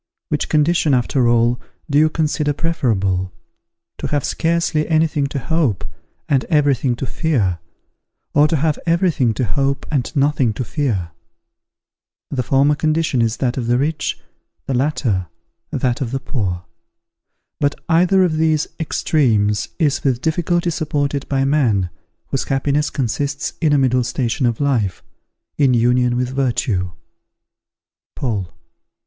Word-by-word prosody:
Which - - -1
condition, 155 -1 +3
after 125 0 +2
all, 120 +1 +2 0.3
do 145 -1 +3
you 155 +1 +5
consider 155 -2 0
preferable, 100 - 0 0.7
to - - -2
have 145 -2 -1
scarcely 165 -2 0
any 160 0 +3
thing 145 -3 -1
to 140 - -5
hope, 135 - 0 0.4
and 135 -3 +2
every 150 -4 +3
thing 125 -1 -1
to 135 - -4
fear, 120 - 0 0.7
or 145 +1 +5
to 160 - 0
have 155 0 0
every 170 +2 +3
thing 125 -8 +1
to 130 - 0
hope 135 +7 -1
and 140 -5 0
nothing 140 -5 +2
to 125 - -3
fear? 110 - -2 1.2
The 135 - 0
former 135 +3 +3
condition 155 -3 +1
is 115 0 0
that 125 -1 -1
of 120 -3 -2
the 120 +1 +3
rich, 150 +3 -1 0.5
the 135 - -2
latter, 120 - 0 0.4
that 125 -2 -1
of 125 - -1
the 135 +2 -2
poor. 95 - -3 0.9
But 145 0 +1
either 180 +3 +4
of 160 -4 +1
these 155 -1 +2
extremes 115 -10 +1
is 150 -5 +1
with 130 -4 +1
difficulty 170 +3 0
supported 145 -3 -2
by 135 -1 +1
man, 115 - +2 0.4
whose 135 - -1
happiness 145 +2 0
consists 140 +2 -2
in 155 -3 +3
a 145 - +4
middle 130 -2 +2
station 125 +1 -1
of 115 -2 -1
life, 120 -10 0 0.6
in 135 -4 +4
union 120 +1 +2
with 125 0 0
virtue. 115 -9 0 1.2
_Paul. 105 -9 -2
135 Hz, 145 wpm, -19 LUFS, 120-150 Hz, 1.2 s, you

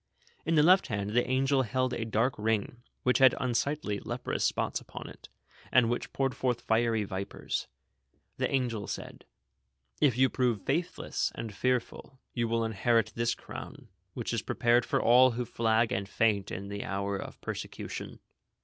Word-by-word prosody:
In 165 - +3
the 150 - +6
left 185 +4 +6
hand 100 -1 -2
the 125 +3 +1
angel 135 +1 +3
held 130 +1 0
a 115 - -2
dark 115 +3 +1
ring, 110 +2 -1 0.2
which 125 +1 +3
had 130 -1 +7
unsightly, 125 -3 -1
leprous - - -3
spots - - 0
upon - - -9
it, - - -13 0.4
and 120 -2 +4
which 120 - -3
poured 135 -1 0
forth 125 -2 0
fiery 115 -1 +2
vipers. 95 -1 -4 0.7
The - - 0
angel 120 -6 -1
said: - - -7 0.8
"If 130 -5 +4
you 130 +1 +5
pi'ove 120 -6 0
faithless 165 +5 -1
and 115 -2 -5
fearful, 125 +3 -2 0.2
you 120 -2 0
will 115 0 0
inherit 115 +1 +1
this 115 0 +1
crown, - - -10 0.3
which - - -3
is - - 0
prepared 120 0 +2
for - - +1
all 125 +1 +6
who 120 +1 -2
flag 115 0 +1
and 100 0 -2
faint 105 -4 +1
in 100 +1 -6
the 100 0 -4
hour 100 +1 -2
of 95 - -7
persecution." - - -6
120 Hz, 165 wpm, -30 LUFS, 110-130 Hz, 0.8 s, had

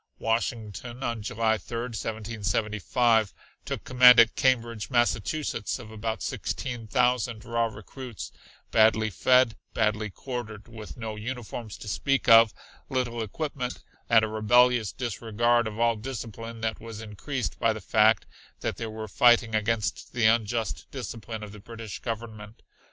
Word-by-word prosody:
Washington, 115 +1 -3
on 115 -2 -2
July 110 +1 0
3rd, 120 +1 -5
1775, 110 +1 0 0.3
took - - -4
command 125 -1 +7
at 115 0 +6
Cambridge, 115 -4 +1
Massachusetts, 120 0 0
of 115 -4 -11
about 110 0 -4
sixteen 120 -4 -4
thousand 125 -2 +1
raw 115 0 +1
recruits, 115 +2 -8 0.4
badly 110 -1 +4
fed, 125 +7 +4 0.2
badly 110 -1 +1
quartered, 110 -2 -7
with 110 -2 -10
no 110 -2 -5
uniforms 115 -1 -6
to - - -10
speak 135 +7 0
of, 115 -1 +8 0.4
little 125 -3 -1
equipment 125 +2 -4 0.3
and 115 -1 +6
a - - -3
rebellious 115 +1 +3
disregard 120 0 0
of 110 +1 -6
all 115 0 +3
discipline 115 -1 -7
that 110 -1 -2
was 115 -2 -8
increased 110 +5 -4
by 115 - +3
the 110 - -4
fact 110 +2 +3 0.4
that - - -2
they 115 - -4
were 110 0 -6
fighting 115 +2 +4
against 110 +1 -1
the 120 -3 +1
unjust 110 - +1
discipline 110 -1 -6
of 105 - -8
the 105 - -11
British 115 -1 -8
Government. 110 -2 -7
115 Hz, 140 wpm, -27 LUFS, 110-120 Hz, 0.4 s, of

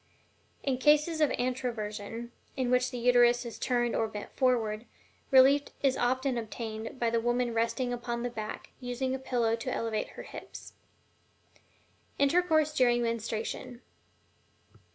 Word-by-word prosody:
In 260 -3 0
cases 300 +3 +3
of 300 - +5
ANTROVERSION, 235 -2 -3 0.3
in 255 -2 0
which 250 0 +3
the 250 - -6
Uterus 245 0 +4
is 235 - -7
turned 240 -2 +1
or 225 - +1
bent 210 -1 -8
forward, 235 -4 +1 0.4
relief 275 +2 +6 0.2
is 270 -2 +3
often 255 +1 0
obtained 225 +1 -6
by 235 -1 +1
the 230 - +2
woman 240 +1 0
resting 230 +2 0
upon 240 0 -3
the 245 - -2
back, 215 -2 -6
using 255 +1 -2
a 265 - -2
pillow 240 -3 +1
to 230 - -4
elevate 225 -2 -2
her - - -6
hips. - - -10 1.4
INTERCOURSE 310 +1 +3
DURING 240 -3 +3
MENSTRUATION. 230 +2 -3
245 Hz, 135 wpm, -30 LUFS, 230-260 Hz, 1.4 s, relief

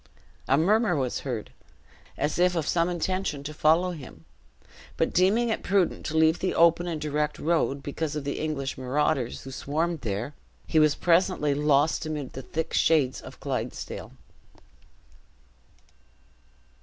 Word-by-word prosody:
A 135 - +4
murmur 205 +4 +3
was 130 -4 -1
heard, 120 -6 -5 0.7
as 150 +3 -1
if 180 0 +3
of 160 -3 -1
some 170 0 +2
intention 175 -3 -2
to 150 +2 -6
follow 165 +4 +3
him; 130 - -10 0.7
but - - 0
deeming 210 +7 +3
it 225 - -1
prudent 190 -2 0
to 160 - -2
leave 160 +1 +4
the 185 - -1
open 170 +1 +4
and 165 -3 -3
direct 150 0 -1
road, 150 -4 0
because 150 +1 -3
of 150 - -3
the 140 - -3
English 145 -4 -3
marauders 130 -1 0
who 135 - -8
swarmed 155 +4 -2
there, 110 +5 -3 0.3
he 160 - +2
was 155 -1 +4
presently 170 -4 +2
lost 150 +2 +2
amid 150 -4 -4
the 135 - -6
thick 160 +4 -4
shades 145 -6 +2
of - - -12
Clydesdale. - - -5
155 Hz, 145 wpm, -26 LUFS, 140-170 Hz, 0.7 s, A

